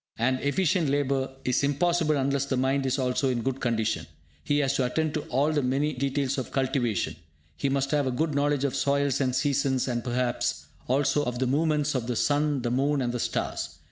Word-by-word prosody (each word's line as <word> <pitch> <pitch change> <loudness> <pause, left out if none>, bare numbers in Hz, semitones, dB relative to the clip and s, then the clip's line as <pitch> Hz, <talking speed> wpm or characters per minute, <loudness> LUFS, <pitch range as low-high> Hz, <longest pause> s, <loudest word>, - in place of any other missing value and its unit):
And 130 +3 +1
efficient 165 +2 +1
labour 135 -1 0 0.2
is 125 +2 +1
impossible 155 +2 +2
unless 140 0 0
the 135 -2 -1
mind 135 +1 +1
is 130 - 0
also 130 +1 0
in 120 -2 -1
good 135 +1 -2
condition. 115 -3 -1 0.4
He 145 - +1
has 140 -2 +2
to 130 - +2
attend 155 +4 -1
to 155 - -1
all 145 +3 +2
the 150 -2 +1
many 140 +4 0
details 135 +1 -1
of 130 - -5
cultivation; 120 - 0 0.4
he 140 - -1
must 135 0 0
have 145 -3 +2
a - - 0
good 150 +5 -1
knowledge 145 0 +1
of 140 -3 0
soils 140 -1 +1
and 130 -2 +1
seasons, 135 -2 +1
and 120 -2 -2
perhaps 125 0 -1 0.2
also 140 +3 +2
of 125 -3 -3
the 130 - 0
movements 150 +2 +1
of 125 -3 -2
the 125 - -1
sun, 145 0 +1
the 120 - -1
moon, 140 +3 +1
and 120 -2 -1
the 125 - -2
stars. - - -3
135 Hz, 205 wpm, -27 LUFS, 125-145 Hz, 0.4 s, impossible